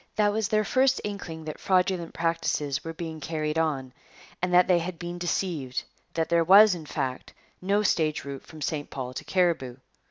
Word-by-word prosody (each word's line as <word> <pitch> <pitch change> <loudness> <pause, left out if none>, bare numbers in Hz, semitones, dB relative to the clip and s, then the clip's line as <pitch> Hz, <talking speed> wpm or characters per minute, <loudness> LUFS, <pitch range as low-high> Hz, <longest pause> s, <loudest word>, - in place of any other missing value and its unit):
That 205 -1 +3
was 220 -1 0
their 215 0 +2
first 260 +5 +3
inkling 175 -6 -6
that 155 - -6
fraudulent 185 -2 +1
practices 155 -3 -1
were 165 - -4
being 160 -1 -6
carried 155 0 -2
on 135 -6 -1 0.5
and 180 0 0
that 180 0 +6
they 180 -2 +4
had 170 +1 -5
been 175 +1 -6
deceived, 170 -7 -2 0.3
that 165 -1 +1
there 170 0 +3
was, 200 +4 +8
in 160 -4 -7
fact, 130 -2 -4 0.3
no 200 +3 +1
stage 155 -6 +1
route 140 -1 -6
from 155 -2 -10
St 145 -1 -3
Paul 130 -2 -5
to - - -6
Cariboo. 170 -9 +1
165 Hz, 185 wpm, -27 LUFS, 155-185 Hz, 0.5 s, was